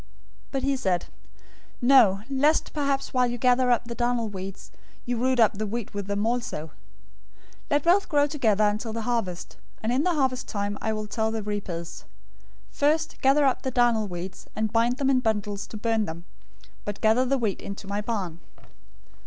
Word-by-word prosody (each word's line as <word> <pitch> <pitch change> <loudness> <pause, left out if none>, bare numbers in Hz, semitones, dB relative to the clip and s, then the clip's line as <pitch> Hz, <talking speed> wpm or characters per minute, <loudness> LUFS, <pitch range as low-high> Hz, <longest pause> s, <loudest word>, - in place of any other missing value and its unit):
013:029 - - -26 0.4
"But 270 -1 -3
he 275 0 +2
said, 185 -9 0 0.7
'No, 240 -7 +5
lest 285 +3 +2
perhaps 280 -2 -1
while 250 -1 +3
you 240 0 -3
gather 250 +1 +3
up 240 -1 +2
the 235 - -5
darnel 240 -1 0
weeds, 195 -1 -8 0.3
you 245 - -1
root 255 +2 +1
up 215 -3 +4
the 215 - -1
wheat 230 +1 -4
with 200 -1 -4
them. 200 0 -1
013:030 230 -9 -2 1.0
Let 290 -1 +2
both 370 +4 +3
grow 290 -2 +4
together 230 -8 +1
until 210 +2 0
the 230 0 -3
harvest, 215 -7 -3 0.3
and 225 - 0
in 255 +3 +2
the 355 -1 +1
harvest 260 -3 0
time 205 -1 -3
I 220 - 0
will 215 -1 -3
tell 220 +1 -1
the 220 -1 -3
reapers, 190 -5 -5 0.7
"First, 310 +2 0
gather 275 +2 +4
up 265 - +2
the 260 - -2
darnel 240 -4 +2
weeds, 180 +1 -7
and 220 0 -1
bind 235 +2 +2
them 275 -1 +2
in 260 - +4
bundles 210 -3 -1
to 215 - -8
burn 225 0 +1
them; 170 0 -7 0.6
but 205 -1 -5
gather 220 +4 +4
the 270 +2 +1
wheat 220 -6 -1
into 200 0 -7
my 200 +1 -2
barn."'" 195 -7 -3
230 Hz, 185 wpm, -26 LUFS, 205-260 Hz, 1.0 s, No